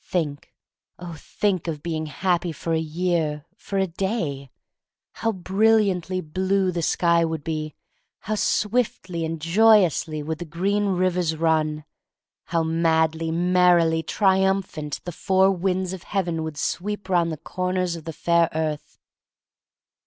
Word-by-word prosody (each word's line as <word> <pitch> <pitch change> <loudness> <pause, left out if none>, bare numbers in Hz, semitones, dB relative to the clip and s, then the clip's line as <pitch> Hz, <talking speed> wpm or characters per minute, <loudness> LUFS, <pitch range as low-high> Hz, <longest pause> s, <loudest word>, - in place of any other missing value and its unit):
Think, 150 -6 -3 0.5
oh, 175 -2 -8
think, 185 +3 -2
of 155 -3 -4
being 160 -2 -3
happy 175 +3 0
for 165 +1 -3
a 160 - +2
year 160 -2 -1
— - - -40
for 200 - -2
a 190 - +3
day! 170 - -3 0.6
How 225 - -1
brilliantly 190 -2 +1
blue 185 +4 0
the 170 -1 -2
sky 170 +1 +2
would 160 -2 -3
be; 155 -1 -4 0.5
how 215 - -3
swiftly 210 -3 0
and 160 0 -3
joyously 170 -4 +3
would 160 +1 -4
the 175 - -5
green 195 +6 0
rivers 180 -3 +1
run; 155 -2 0 0.6
how 165 -2 0
madly, 160 0 +1
merrily 175 -1 +3
triumphant 190 -5 0
the 175 - -5
four 190 +3 +2
winds 185 0 -1
of 190 - -7
heaven 175 -4 -2
would 160 -2 -5
sweep 205 +6 -3
round 175 -3 +2
the 155 - -4
corners 180 +2 -2
of 160 -2 -10
the 165 - -5
fair 170 +1 +2
earth! 155 -2 -3
170 Hz, 140 wpm, -24 LUFS, 160-190 Hz, 0.6 s, a